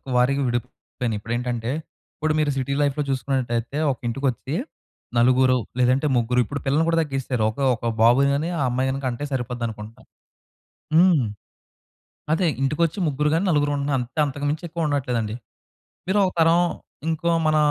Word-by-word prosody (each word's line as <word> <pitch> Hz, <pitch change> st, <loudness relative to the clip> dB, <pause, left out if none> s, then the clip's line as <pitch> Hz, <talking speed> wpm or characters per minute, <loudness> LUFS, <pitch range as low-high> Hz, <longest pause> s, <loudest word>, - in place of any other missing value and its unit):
వారీగా 130 Hz, +3 st, +3 dB
విడిపోయినాయి. 120 Hz, -1 st, -3 dB
ఇప్పుడేంటంటే 120 Hz, +1 st, -2 dB, 0.4 s
ఇప్పుడు 155 Hz, 0 st, 0 dB
మీరు 150 Hz, -1 st, +2 dB
సిటీ 135 Hz, +1 st, -1 dB
లైఫ్‌లో 145 Hz, +1 st, +1 dB
చూసుకున్నట్టయితే 130 Hz, -1 st, -1 dB
ఒక 130 Hz, -, -4 dB
ఇంటికొచ్చి 135 Hz, +3 st, -2 dB, 0.6 s
నలుగురు 130 Hz, +2 st, +4 dB, 0.2 s
లేదంటే 130 Hz, +4 st, +3 dB
ముగ్గురు 120 Hz, +1 st, +1 dB
ఇప్పుడు 140 Hz, +5 st, -5 dB
పిల్లల్ని 145 Hz, +4 st, +2 dB
కూడా 165 Hz, 0 st, +2 dB
తగ్గిసరు. 135 Hz, -6 st, -2 dB
ఒక -, -, -18 dB, 0.2 s
ఒక 115 Hz, -, -9 dB, 0.2 s
బాబుని 125 Hz, +5 st, +5 dB
గాని 150 Hz, +4 st, -1 dB
ఆ -, -, 0 dB
అమ్మాయి‌న్ని 130 Hz, +2 st, -1 dB
కంటే 125 Hz, +2 st, -2 dB
సరిపోద్ది 125 Hz, -2 st, -3 dB
అనుకుంటాం. 110 Hz, 0 st, -9 dB, 0.9 s
హ్మ్. 170 Hz, -6 st, +5 dB, 1.1 s
అదే 175 Hz, +3 st, +2 dB, 0.2 s
ఇంటికొచ్చి 150 Hz, +6 st, 0 dB
ముగ్గురు 150 Hz, 0 st, +1 dB
గాని 165 Hz, +4 st, +1 dB
నలుగురు 145 Hz, -2 st, +2 dB
ఉంటున్నాం. 140 Hz, 0 st, 0 dB
అంతే 125 Hz, +5 st, -7 dB
అంతకు 145 Hz, +1 st, -5 dB
మించి 155 Hz, +3 st, -3 dB
ఎక్కువ 165 Hz, -1 st, -2 dB
ఉండట్లేదండి. 125 Hz, -7 st, -1 dB, 0.7 s
మీరు 190 Hz, +3 st, +1 dB
ఒక 185 Hz, -, +1 dB
తరం 165 Hz, +1 st, +5 dB, 0.5 s
ఇంకో 165 Hz, +1 st, 0 dB
మన 155 Hz, 0 st, +3 dB
135 Hz, 145 wpm, -23 LUFS, 125-150 Hz, 1.1 s, బాబుని